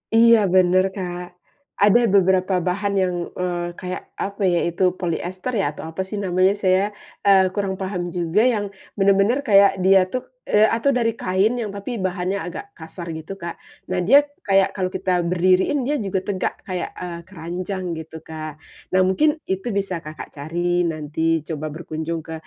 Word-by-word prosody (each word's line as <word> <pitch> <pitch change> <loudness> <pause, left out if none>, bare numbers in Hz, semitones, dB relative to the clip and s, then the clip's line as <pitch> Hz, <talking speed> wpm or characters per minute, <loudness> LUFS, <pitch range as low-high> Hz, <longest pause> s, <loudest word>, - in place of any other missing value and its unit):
Iya 230 0 +7 0.2
bener, 185 0 +5
Kak. 180 -2 -4 0.6
Ada 210 +3 +6 0.2
beberapa 190 0 +3
bahan 200 +2 0
yang, 180 -1 +1 0.3
eee, 175 -1 -1
kayak 185 0 -5 0.2
apa 200 0 -5
ya 170 - +3
itu, 170 +2 -1 0.2
polister 185 +6 -3
ya, - - +1
atau - - -9
apa 165 +4 -4
sih 210 - -5
namanya, 185 +1 +3
saya, 185 0 +4 0.4
eee, 190 -2 +6
kurang 200 -2 -1
paham 185 -2 -2
juga, 175 +4 +2
yang 205 -1 -1 0.3
bener-bener 200 +5 +3
kaya 200 -1 +7 0.2
dia 190 +1 +6
tuh, 255 - -1 0.2
eee, 215 +1 +4
atau 230 +5 +1
dari 230 -2 +2
kain 190 +5 +2
yang 220 - -3
tapi 200 +5 -5
bahannya 185 +1 -1
agak 175 - -6
kasar 170 +1 -9
gitu, 160 +5 -7
Kak. 170 0 -5 0.3
Nah 185 0 0
dia 275 +4 +8 0.3
kayak 195 -1 +5
kalau 185 -1 0
kita 190 0 -1 0.2
berdiriin 185 +9 +3
dia 295 - +1
juga 190 0 0
tegak 190 -3 -1
kayak, 185 -2 -3
eee, 175 -1 -5
keranjang 185 +1 -5 0.2
gitu, 160 0 -10
Kak. 155 -1 -7 0.3
Nah 185 - +5
mungkin 300 +12 +3 0.2
itu 190 +3 -2
bisa 195 -3 -1
Kakak 155 0 -8
cari 175 +4 0
nanti 155 0 -5 0.3
coba 155 -2 -4
berkunjung 160 0 -4
ke, 160 - -6
185 Hz, 170 wpm, -22 LUFS, 175-200 Hz, 0.6 s, dia